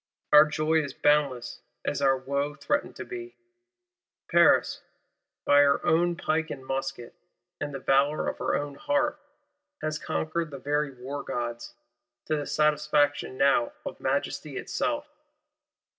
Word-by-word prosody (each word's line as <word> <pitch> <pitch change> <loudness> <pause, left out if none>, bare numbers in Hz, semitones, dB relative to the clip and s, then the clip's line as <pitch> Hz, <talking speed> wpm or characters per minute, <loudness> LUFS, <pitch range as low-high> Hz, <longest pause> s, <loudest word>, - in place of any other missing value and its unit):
Our 150 +1 +10
joy 155 +1 +1
is 140 -3 -6
boundless 145 -5 +1 0.2
as - - -1
our 135 -1 +4
wo 140 +2 -2
threatened 290 - -1
to - - -7
be. 360 -1 -8 0.9
Paris, - - +4 0.6
by 145 - +6
her 140 -1 +4
own 175 +2 +3
pike 160 0 -1
and 135 -3 -7
musket, 135 -3 -4 0.5
and 145 - -3
the 135 - -4
valour 140 +3 +2
of - - -3
her - - 0
own 145 0 -3
heart, 295 - 0 0.6
has 155 -1 -2
conquered 160 +1 -2
the 140 - -7
very 145 +2 -1
wargods,—to 120 0 -6
the 145 -1 -3
satisfaction 150 -3 +1
now 285 - +3
of - - -6
Majesty - - -2
itself. 295 -1 -2
145 Hz, 130 wpm, -27 LUFS, 135-160 Hz, 0.9 s, Our